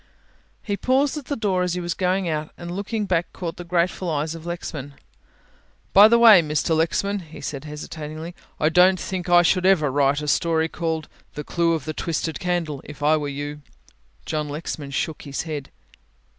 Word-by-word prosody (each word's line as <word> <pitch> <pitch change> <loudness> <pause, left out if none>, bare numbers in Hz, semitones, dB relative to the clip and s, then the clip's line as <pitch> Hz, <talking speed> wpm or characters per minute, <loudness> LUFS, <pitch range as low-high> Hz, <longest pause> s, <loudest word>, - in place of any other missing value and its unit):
He 205 - -2
paused 265 +8 +1
at 290 - -6
the 285 - -2
door 200 -6 0
as 180 -1 0
he - - -2
was 175 -1 -2
going 185 0 0
out 155 -1 -2
and 175 0 -7
looking 205 +3 -2
back 175 -3 0
caught 170 -3 -5
the 175 - -6
grateful 175 +1 0
eyes 155 0 -1
of 165 0 -9
Lexman. 145 -5 -6 1.0
"By 205 +2 +9
the 235 +1 +5
way, 225 -6 +9
Mr. 155 +1 0
Lexman," 200 +5 0
he 160 -3 -12
said 140 0 -5
hesitatingly, 155 +2 -7 0.3
"I 155 - +3
don't 180 +2 +5
think 185 -1 -4
I 175 0 +7
should 180 +2 +2
ever 175 -7 +4
write 140 +1 +2
a - - -4
story 160 +2 +1
called 160 -2 -3 0.3
'The 150 - -4
Clue 170 +2 +1
of 155 -5 -3
the 155 - -3
Twisted 160 -1 -3
Candle,' 170 -6 -2
if 150 0 -10
I 155 +2 +5
were 150 -2 -2
you." 145 +1 -5 0.6
John 150 -1 -2
Lexman 145 -1 -5
shook 150 +3 -3
his 140 -1 -4
head. 150 -4 -5
165 Hz, 190 wpm, -23 LUFS, 150-180 Hz, 1.0 s, By